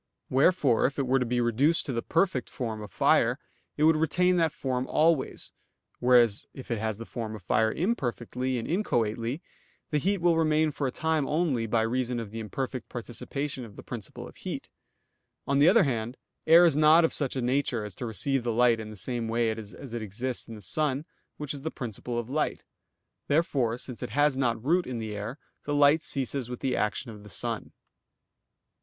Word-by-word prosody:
Wherefore 135 -3 +4
if 135 - -7
it 140 - 0
were 130 +1 +3
to 125 - -1
be 120 +1 0
reduced 130 +8 +2
to 135 - -3
the 115 - -1
perfect 165 - 0
form 110 -4 -4
of 105 - -8
fire, - - +3 0.4
it 150 - +1
would 160 +1 +6
retain 180 +3 +2
that 165 -2 +2
form 130 -2 -2
always; 155 -3 +1 0.5
whereas 120 -4 +4
if 130 -2 -9
it 115 - 0
has 110 -1 -2
the 115 - -7
form 110 -3 -5
of 105 - -11
fire 110 +4 +2
imperfectly 130 - -2
and 115 - -4
inchoately, 120 - -1 0.5
the 150 - +2
heat 200 +7 +1
will 170 -2 +3
remain 155 -1 +3
for 140 -1 -2
a - - -2
time 160 0 0
only, 150 -8 0
by 115 0 +2
reason 125 +1 -1
of 110 -3 -6
the 115 - -5
imperfect 130 +2 -4
participation 130 +3 -4
of 105 -4 -11
the - - -10
principle - - -7
of - - -15
heat. - - -6 0.7
On 140 0 +1
the 150 +4 +7
other 215 +1 +6
hand, 120 -3 -2 0.3
air 165 +2 +8
is 165 -4 +4
not 155 +2 +6
of - - -1
such 140 -3 0
a - - -1
nature 125 -3 0
as 105 - -8
to 120 +6 -5
receive 125 +3 -1
light 120 0 +3
in 110 -1 -6
the 105 - -10
same 115 +4 -3
way 115 0 +1
as 110 -3 -7 0.2
it 120 - -3
exists 120 +5 -4
in 115 - -8
the 105 - -11
sun, 145 - -1 0.3
which 150 -1 -4
is 140 - -7
the 160 - -2
principle 120 -2 -5
of 120 -1 -2
light. 150 +4 -1 0.6
Therefore, 140 -7 +1
since 125 -2 -5
it - - -4
has 145 +4 +2
not 120 -3 0
root 175 +4 +2
in 125 -2 -4
the 110 -2 -4
air, 105 +7 -5 0.3
the 145 - -1
light 145 +2 +5
ceases 135 -5 -2
with 125 - -6
the 130 -2 0
action 110 +3 -1
of 105 -2 -11
the 105 - -12
sun. 115 +2 -4
125 Hz, 205 wpm, -28 LUFS, 115-150 Hz, 0.7 s, air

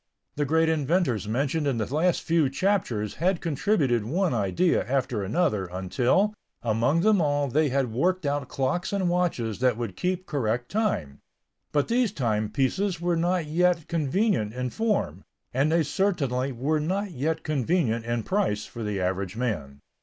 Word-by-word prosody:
The 145 - 0
great 160 +3 +2
inventors 155 - +1
mentioned 140 +6 0
in 135 -4 0
the 110 +4 -3
last 170 +3 +2
few 165 -4 +2
chapters 135 - 0
had 180 0 +2
contributed 145 - +1
one 170 - 0
idea 120 - +1
after 125 -4 0
another, 105 - 0
until, 120 - +1 0.3
among 120 +8 +2
them 210 -1 +4
all 145 -2 +1
they 150 +3 +2
had 130 -3 0
worked 180 +7 +1
out 140 -1 -1
clocks 145 +7 -1
and 195 -3 0
watches 160 - -1
that 125 -3 +2
would 115 -6 -4
keep 185 - -2
correct 125 -6 -2
time. 90 - -1 0.5
But 145 -1 +1
these 240 -2 +2
timepieces 135 - 0
were 175 0 0
not 175 0 +1
yet 170 +1 +1
convenient 160 - 0
in 125 -1 -2
form, 205 - -1 0.3
and 140 +5 +2
they 165 0 +3
certainly 140 -7 0
were 140 +6 0
not 190 +6 -2
yet 160 +2 -2
convenient 140 -5 0
in 120 0 -2
price 185 - 0
for 120 - -9
the 105 -2 -2
average 95 +1 -2
man. 75 - -3
145 Hz, 160 wpm, -26 LUFS, 115-175 Hz, 0.5 s, them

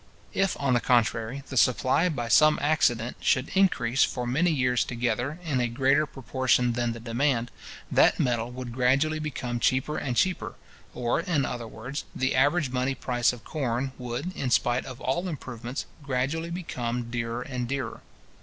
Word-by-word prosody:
If, 195 -1 +1
on 140 -3 +1
the 120 - +4
contrary, 120 +2 +1
the 130 - -4
supply, 130 - +3
by 120 -7 -3
some 155 +6 +5
accident, 125 -6 +1
should 130 +1 +1
increase, 155 -10 +3
for 125 - -1
many 145 +9 +2
years 125 -5 +2
together, 120 +4 -2
in 145 -6 0
a 120 - +1
greater 135 +5 +2
proportion 130 -1 +1
than 120 -1 -1
the 115 - -8
demand, 120 +1 0 0.4
that - - +4
metal 120 -2 0
would 125 -1 -7
gradually 135 +5 +2
become 125 -5 -3
cheaper 130 +6 +1
and 125 -3 -3
cheaper; 185 +8 0 0.4
or, 120 +3 0
in 165 -5 0
other 120 -2 -4
words, 125 +6 -6
the 130 0 0
average 145 +1 +2
money 130 +1 0
price 120 -1 +1
of 120 -4 -10
corn 130 -3 -2
would, 125 +9 -4
in 130 - -2
spite 120 +1 +2
of 125 - -8
all 175 +8 -1
improvements, 130 -5 -5 0.2
gradually 140 +5 -1
become 125 -9 -4
dearer 115 0 -2
and 125 -2 -4
dearer. 130 -3 -4
125 Hz, 165 wpm, -27 LUFS, 120-140 Hz, 0.4 s, some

